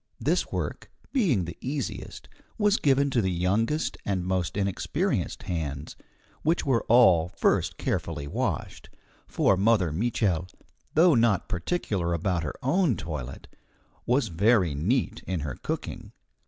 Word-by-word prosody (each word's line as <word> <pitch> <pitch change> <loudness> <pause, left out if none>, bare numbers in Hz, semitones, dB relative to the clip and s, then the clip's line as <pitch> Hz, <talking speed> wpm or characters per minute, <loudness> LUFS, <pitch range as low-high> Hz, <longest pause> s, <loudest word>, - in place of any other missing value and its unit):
This - - 0
work, - - -4 0.2
being 165 - +2
the 85 - -7
easiest, 135 0 -5 0.3
was 210 0 +3
given 140 0 +2
to 125 -3 +2
the 95 - 0
youngest 100 - 0
and 95 -3 -1
most 95 0 -1
inexperienced 100 -2 -1
hands, 75 -4 -4 0.5
which 165 +3 +1
were 130 -5 +2
all 95 -9 +5
first 90 - 0
carefully 70 - -2
washed, 70 - -3 0.4
for 100 - +2
Mother 100 -3 +3
Mitchel, 95 -2 0 0.5
though 165 +2 +6
not 115 -5 +3
very - - -31
particular 95 - -1
about 85 +1 0
her 80 - -4
own 150 - +2
toilet, 70 -5 -6 0.6
was 125 -2 +2
very 95 -1 +3
neat 105 - 0
in 95 -4 -2
her 70 -3 -4
cooking. - - -5
100 Hz, 135 wpm, -27 LUFS, 85-130 Hz, 0.6 s, though